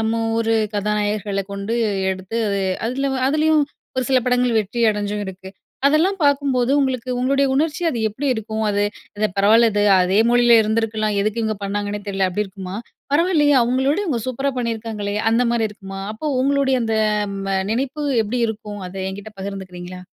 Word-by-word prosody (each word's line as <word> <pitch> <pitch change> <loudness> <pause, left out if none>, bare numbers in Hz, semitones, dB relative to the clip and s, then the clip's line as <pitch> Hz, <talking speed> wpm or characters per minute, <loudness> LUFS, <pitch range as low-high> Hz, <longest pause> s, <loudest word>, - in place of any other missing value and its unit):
நம்ம 225 +1 0 0.2
ஊரு 225 0 +1 0.2
கதாநாயகர்களை 205 -1 -1
கொண்டு 200 +3 -3 0.4
எடுத்து 190 +4 -6
அது 200 0 0 0.3
அதில 275 +3 -1
வ - - -1
அதிலயும் 310 0 +3 0.3
ஒரு 255 - +1
சில 260 - +5
படங்கள் 250 -1 +2
வெற்றி 215 +4 -4
அடைஞ்சும் 205 0 -3
இருக்கு. 190 0 -9 0.4
அதெல்லாம் 320 +7 +3
பார்க்கும்போது, 275 -3 +2
உங்களுக்கு 255 -2 -1
உங்களுடைய 275 +2 +2
உணர்ச்சி 300 +3 0
அது 245 - -3
எப்படி 265 +7 -5
இருக்கும்? 220 0 -4
அது, 205 0 +1 0.4
"இது 215 - +3
பரவாயில்ல 220 +4 +5
இது. 205 0 +1 0.2
அதே 185 +2 +1
மொழியில 240 0 +5
இருந்துருக்கலாம், 215 -1 0
எதுக்கு 215 +3 -1
இவுங்க 220 -1 -1
பண்ணாங்கன்னே 205 +1 -3
தெரியல." 195 -1 +1
அப்படி 205 +4 -1
இருக்குமா? 190 -1 -8 0.4
"பரவால்லையே! 300 -2 +3
அவுங்களோட 265 +6 +1
இவுங்க 280 - -1
சூப்பரா 270 +2 -1
பண்ணியிருக்காங்களே!" 220 -3 -3
அந்தமாரி 235 -1 +2
இருக்குமா? 195 -2 -9
அப்போ 300 +8 -4
உங்களுடைய 275 -1 +2
அந்த 225 -1 0 0.4
ம் 195 0 -5
அ - - +2 0.2
நினைப்பு 270 +5 -2 0.2
எப்படி 230 +4 -2
இருக்கும்? 210 -2 -6
அதை 190 +1 -6
என்கிட்ட 205 +3 -9
பகிர்ந்துக்கிறீங்களா? 185 -2 -7
225 Hz, 160 wpm, -21 LUFS, 205-260 Hz, 0.4 s, சில